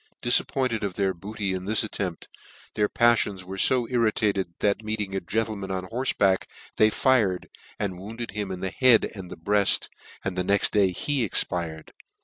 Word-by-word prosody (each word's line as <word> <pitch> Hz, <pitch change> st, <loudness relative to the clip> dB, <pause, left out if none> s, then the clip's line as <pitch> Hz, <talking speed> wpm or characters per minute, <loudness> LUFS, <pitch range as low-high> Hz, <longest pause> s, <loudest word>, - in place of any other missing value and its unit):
Difappoimed 120 Hz, -1 st, +1 dB
of 100 Hz, -3 st, -3 dB
their 95 Hz, -2 st, +1 dB
bodty 100 Hz, +2 st, -4 dB
in 95 Hz, 0 st, -4 dB
this 110 Hz, +3 st, +2 dB
attempt, 95 Hz, -5 st, -4 dB, 0.5 s
their 105 Hz, -1 st, +1 dB
paflions 110 Hz, -5 st, +2 dB
were 95 Hz, +2 st, -7 dB
fo 125 Hz, +2 st, +4 dB
irri 115 Hz, -2 st, +2 dB
tated, 100 Hz, -3 st, 0 dB
that, 105 Hz, +1 st, 0 dB
meeting 105 Hz, -2 st, -3 dB
a -, -, +1 dB
gentleman 105 Hz, +1 st, -2 dB
on 95 Hz, -1 st, -2 dB
horfeback, 110 Hz, -6 st, +1 dB, 0.3 s
they 110 Hz, -, +5 dB
fired, 110 Hz, -7 st, +1 dB, 0.3 s
and 95 Hz, -3 st, -3 dB
wounded 115 Hz, +4 st, -7 dB
him 105 Hz, -2 st, -4 dB
in 90 Hz, -1 st, -5 dB
the 95 Hz, -1 st, -2 dB
head 125 Hz, -2 st, +5 dB
and 95 Hz, -3 st, -9 dB
breaft, 100 Hz, +4 st, +1 dB, 0.4 s
and 100 Hz, -2 st, -2 dB
the 90 Hz, -, 0 dB
next 100 Hz, +2 st, +2 dB
day 100 Hz, -3 st, +3 dB
he 135 Hz, -, 0 dB
expired. 85 Hz, -6 st, -2 dB
100 Hz, 170 wpm, -25 LUFS, 95-110 Hz, 0.5 s, they